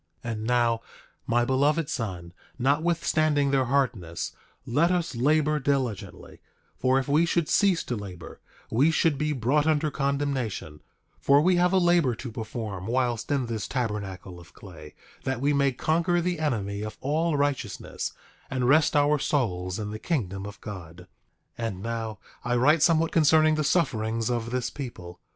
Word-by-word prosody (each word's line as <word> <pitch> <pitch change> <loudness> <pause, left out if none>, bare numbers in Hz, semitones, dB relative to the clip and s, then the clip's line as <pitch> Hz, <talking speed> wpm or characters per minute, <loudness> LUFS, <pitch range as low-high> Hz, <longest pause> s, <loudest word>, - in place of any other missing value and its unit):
9:6 115 - -2
And 110 -1 -4
now, 120 -1 +2 0.5
my 120 +1 +2
beloved 145 +4 +2
son, 90 -10 -4 0.2
notwithstanding 150 +1 +1
their 135 -2 +2
hardness, 120 -11 -1 0.3
let 145 +7 +2
us 175 -3 0
labor 150 +4 +2
diligently; 130 -7 -3 0.3
for 130 +1 +2
if 135 - -1
we 150 +3 +3
should 170 -2 +1
cease 195 -5 +3
to 125 - -3
labor, 95 -6 -9 0.3
we 135 +8 +4
should 160 -1 +2
be 150 0 0
brought 145 +3 +1
under 155 -1 +2
condemnation; 135 - -2 0.4
for 140 0 +5
we 180 +4 +3
have 180 0 +3
a 190 - +3
labor 175 -8 +3
to 120 +1 -7
perform 110 -4 -5
whilst 120 -1 -1
in 140 -3 +1
this 115 -3 -4
tabernacle 100 -7 -4
of 85 - -17
clay, 80 -6 -12 0.3
that 130 -2 -2
we 145 +3 +2
may 140 -1 +3
conquer 170 +6 +1
the 175 -1 -1
enemy 105 -9 -2
of 110 0 -6
all 155 +3 0
righteousness, 135 -8 -2 0.4
and 130 -2 -1
rest 150 +3 +4
our 145 0 +3
souls 90 -11 -1
in 105 -1 -4
the 110 - -6
kingdom 100 - -2
of 100 - -10
God. 90 -4 -8 0.6
9:7 115 - -1
And 95 -3 -6
now 115 -2 -4 0.3
I 120 0 0
write 145 +6 +4
somewhat 165 0 +3
concerning 155 0 +4
the 155 0 0
sufferings 115 -8 0
of 115 -1 -2
this 125 0 -2
people. 90 -11 -8
130 Hz, 165 wpm, -26 LUFS, 110-150 Hz, 0.6 s, for